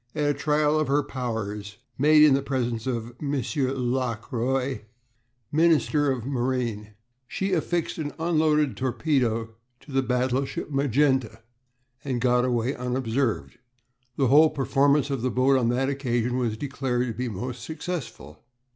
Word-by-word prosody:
At 150 -1 0
a - - 0
trial 150 +1 +1
of 155 - 0
her 145 +2 +2
powers 105 -6 -5 0.2
made 150 +2 +5
in 150 -3 +7
the 135 - +2
presence 120 -4 -2
of 120 -2 -3
M. 145 -1 -1 0.2
Lockroy, 130 -1 -1 0.7
Minister 155 -2 +3
of 125 -3 -3
Marine, 120 -5 -2 0.3
she 195 +7 -2
affixed 170 0 -1
an 145 -2 -3
unloaded 155 -4 +2
torpedo 120 -4 0 0.3
to 145 - -15
the 135 0 +2
battleship 130 +3 -1
Magenta 135 -4 +1 0.6
and 130 -3 -2
got 125 0 +2
away 125 +1 0
unobserved. 125 -1 -2 0.6
The 135 - +1
whole 155 +4 +7
performance 140 +1 +2
of 135 -4 -2
the 130 - 0
boat 130 +2 +3
on 120 -3 +2
that 130 +2 +1
occasion 125 -3 -1
was 115 -3 -1
declared 130 -2 -2
to 120 - -3
be 125 +2 -3
most 120 +4 -5
successful. 135 - -6
130 Hz, 140 wpm, -25 LUFS, 120-145 Hz, 0.7 s, in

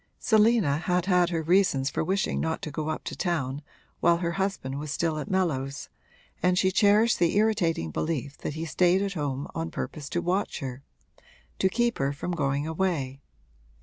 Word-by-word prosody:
Selina 215 - +3
had 180 +1 0
had 180 -2 +3
her 165 -2 -1
reasons 160 -6 +2
for - - -1
wishing 190 +4 0
not 160 0 -2
to 155 - -4
go 155 +1 -3
up 155 - -3
to - - -5
town 145 -6 -2 0.4
while 170 0 +4
her 170 -1 -1
husband 180 -8 -2
was 150 +1 -5
still 160 +1 -1
at 150 - -6
Mellows, 140 -8 -1 0.5
and 180 0 +3
she 190 0 +3
cherished 210 +4 +4
the 170 +1 +2
irritating 195 - +1
belief 145 - -2
that 150 - -4
he 160 +1 -3
stayed 180 +5 +3
at 200 -1 -2
home 145 -4 -3
on 165 0 -3
purpose 150 -3 -5
to 175 - -1
watch 180 +4 -1
her 130 -4 -6 0.8
to 190 - +3
keep 240 +3 0
her 135 0 +1
from 160 +5 -4
going 140 -3 0
away. 160 -6 -2
170 Hz, 180 wpm, -27 LUFS, 145-190 Hz, 0.8 s, while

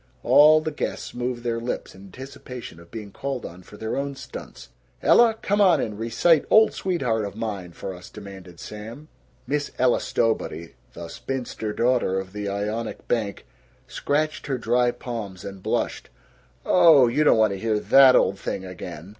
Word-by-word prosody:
All 155 +1 +6
the 155 - -3
guests 150 - -4
moved 120 0 -4
their 115 -1 -1
lips 120 +2 -5
in 95 +1 -14
anticipation 125 -3 -10
of 85 0 -16
being 105 -3 -8
called 135 +3 -5
on 85 +2 -9
for 105 +3 -14
their 110 +1 -4
own 140 0 -3
stunts. 470 - -10 0.3
"Ella, 235 -2 +5
come 205 +1 +1
on 190 -3 +5
and 105 -1 -4
recite 140 +8 +3
'Old 220 0 +6
Sweetheart 130 - -1
of 100 -1 -6
Mine,' 100 -6 -5
for 95 - -6
us," 90 -1 -12
demanded 95 -4 -11
Sam. 115 +9 -9 0.4
Miss 145 +2 -2
Ella 125 -1 +3
Stowbody, 110 -7 -2 0.2
the 85 0 -8
spinster 120 0 -5
daughter 120 -5 +1
of 95 0 -8
the 105 -1 -4
Ionic 105 +3 -4
bank, 105 - -2 0.4
scratched 155 +2 -2
her 135 -2 -1
dry 120 +1 +2
palms 110 -7 -6
and 100 -1 -8
blushed. - - -2 0.6
"Oh, 160 -8 +6
you 135 +6 +1
don't 150 - +5
want 110 -2 +3
to 95 - -6
hear 110 0 0
that 135 +3 +6
old 95 - +2
thing 95 - -4
again." 90 -2 -8
115 Hz, 170 wpm, -24 LUFS, 100-135 Hz, 0.6 s, All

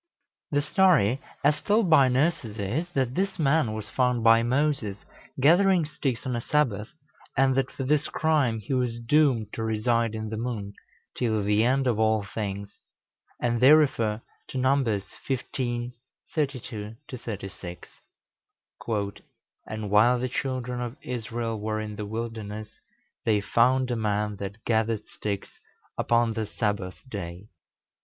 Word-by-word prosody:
The 145 -1 +1
story 150 - +3 0.2
as 150 +1 +3
told 210 -1 +2
by 140 -4 +7
nurses 130 -4 0
is, 120 - -2
that 130 -4 0
this 195 +5 -1
man 150 -5 +2
was 110 -1 -5
found 125 -2 +1
by 115 0 +7
Moses 120 -5 0 0.3
gathering 175 +4 +5
sticks 140 -5 -3
on 125 -2 -1
a 120 - -2
Sabbath, 115 -8 +1 0.5
and 135 0 +4
that, 135 0 +1
for 135 - -5
this 150 +2 +2
crime, 145 -8 +1
he 120 - -4
was 125 -2 0
doomed 120 -4 +2
to - - -4
reside 110 +1 +1
in 110 0 -4
the 110 - -3
moon 110 -4 -4 0.4
till 110 -4 0
the 105 +2 +3
end 135 +3 +2
of 120 -4 +1
all 110 -1 +3
things; 100 -1 -5 0.6
and 120 -1 0
they 135 +4 +9
refer 115 -8 +3 0.3
to - - -6
Numbers 130 -6 +2 0.2
xv. 120 -2 -2 0.4
32 125 -8 -3
36: 100 - -7 1.8
"And 110 -1 -4
while 115 +4 +5
the 125 +1 -2
children 125 -1 -3
of 120 +2 -5
Israel 115 -2 -3
were 110 +1 -2
in 105 -1 -5
the 105 0 -5
wilderness, 110 -1 -6 0.4
they 105 -2 +3
found 125 +5 +2
a - - +1
man 105 -1 -1
that 100 +3 -7
gathered 110 -1 +1
sticks 100 -2 -5 0.4
upon 115 -1 +2
the 110 -1 -2
Sabbath 105 -3 -2
day. 95 -3 -7
115 Hz, 145 wpm, -27 LUFS, 105-135 Hz, 1.8 s, they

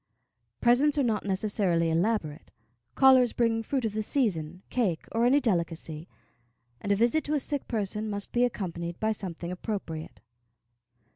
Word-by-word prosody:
Presents 270 +5 +4
are 285 - +3
not 220 -5 0
necessarily 190 -4 +1
elaborate; 165 -3 -1 0.5
callers 260 -3 +6
bring 230 -1 +1
fruit 255 +2 -2
of 215 - -2
the 215 - -1
season, 185 - -1
cake, 195 -10 0
or 230 +1 +2
any 275 +3 +5
delicacy, 170 - -2 0.7
and 205 - -2
a - - +5
visit 240 +9 +2
to 300 - 0
a - - +2
sick 285 +1 -3
person 210 -1 -2
must 205 -1 -5
be 245 - +2
accompanied 175 -7 -3
by 220 0 +1
something 175 -4 -5
appropriate. 180 -5 -5
210 Hz, 150 wpm, -28 LUFS, 175-240 Hz, 0.7 s, callers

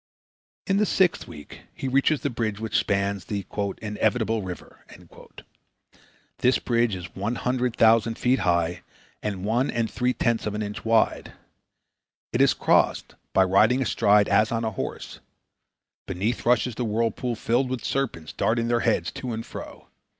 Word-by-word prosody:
In 195 - +1
the 210 - +3
sixth 185 -3 +2
week 75 - -11
he 135 - -4
reaches 140 +3 +2
the 145 - -1
bridge 110 -3 -2
which 110 0 -4
spans 100 -1 0
the 100 -3 -4 0.4
"Inevitable 110 +1 0
River." 90 -2 -9 1.6
This 125 +1 +3
bridge 120 -3 0
is 90 0 -9
100,000 115 +1 +1
feet 125 +1 +2
high 85 0 0 0.4
and 100 -3 -4
one 120 +5 +1
and 115 -2 -1
three 125 +1 0
tenths 115 -3 0
of 105 - -3
an 105 - -2
inch 105 0 -6
wide. 115 0 +1 1.0
It - - +2
is - - +4
crossed - - +2 0.2
by 95 - +4
riding 105 +8 +3
astride 105 -3 +3
as 110 0 +3
on 115 0 -1
a 110 - -1
horse. 95 - -6 0.9
Beneath 100 +6 -2
rushes 125 0 +3
the 120 - -3
whirl 115 +1 0
pool 120 +2 -3
filled 120 +4 0
with 130 -2 -4
serpents 110 - -2
darting 115 +1 0
their 120 0 +2
heads 95 -8 0
to 125 -2 -5
and 115 +1 -5
fro. - - -10
115 Hz, 155 wpm, -25 LUFS, 100-125 Hz, 1.6 s, is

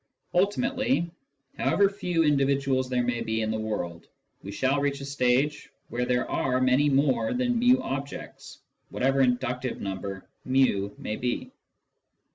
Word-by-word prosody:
Ultimately, 205 +1 +1 0.5
however 200 - +3
few 180 -4 0
indi 145 -3 +3
viduals 135 -1 +1
there 125 -1 +1
may 120 -1 -1
be 110 -1 -1
in 110 - -1
the 110 - -2
world, 90 -6 -4 0.3
we 100 - -7
shall 135 +6 +1
reach 140 0 -1
a 140 - -6
stage 140 +1 +1 0.2
where 125 +1 -1
there 125 0 +1
are 130 -1 0
many 130 +3 +3
more 140 - +2
than 245 -1 +1
/n 250 +1 +5
objects, 140 - -6 0.3
whatever 135 +1 +1
inductive 125 0 0
number 95 0 -5 0.2
\i - - -12 0.5
may 105 - -4
be. 125 - -3
135 Hz, 145 wpm, -27 LUFS, 125-150 Hz, 0.5 s, n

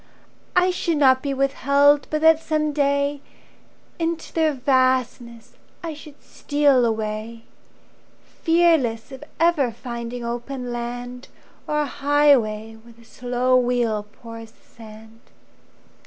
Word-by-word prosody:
I 360 0 +4
should 340 -3 -1
not 260 -2 +4
be 280 - -3
withheld 280 +1 +2
but 305 0 -2
that 320 0 +5
some 305 -2 -1
day 280 0 0 0.8
Into 330 -1 -3
their 320 -2 +2
vastness 255 -3 -1 0.3
I 330 -2 -4
should 295 -1 -14
steal 285 -4 +1
away, 220 0 -4 1.0
Fearless 325 -9 +2
of 265 +2 -10 0.2
ever 320 -7 +2
finding 235 0 -7
open 245 +1 -5
land, 245 +1 -6 0.4
Or 300 0 0
highway 255 -7 +1
where 235 +1 -17
the 230 0 -21
slow 250 +2 -1
wheel 240 -4 0
pours 230 -1 -11
the - - -29
sand. 220 0 -14
255 Hz, 115 wpm, -22 LUFS, 235-290 Hz, 1.0 s, that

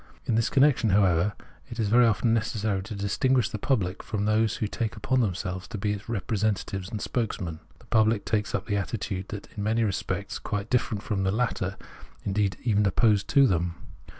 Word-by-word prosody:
In - - 0
this 115 +1 +2
connection, 130 -4 +4
however, 95 -1 +3 0.4
it 115 - -7
is 105 -3 +1
very 120 +2 +6
often 115 +1 +2
necessary 110 -3 0
to 105 +3 -7
distinguish 120 +5 +1
the 105 - -5
public 100 -7 0
from 105 -2 -2
those 110 0 +2
who 110 - -1
take 110 +1 -3
upon 130 -1 +1
themselves 95 -3 -2
to 115 - -6
be 105 +1 -1
its 105 +2 -8
representatives 100 -3 -1
and 110 - -4
spokesmen. 95 -9 -3 0.2
The - - -21
pubhc 110 -2 +2
takes 105 -2 0
up 100 +1 -3
an 100 -2 0
attitude 100 -1 -3 0.2
in 100 - -3
many 110 +2 +1
respects 100 -1 -2
quite 105 0 -4
difierent 115 -4 0
from 105 -3 -1
the 95 0 +1
latter, 105 -4 -1 0.5
indeed, 100 -1 0
even 105 -3 +2
opposed 105 0 +3
to 140 -2 +5
them. 85 -6 +1
105 Hz, 185 wpm, -27 LUFS, 100-115 Hz, 0.5 s, very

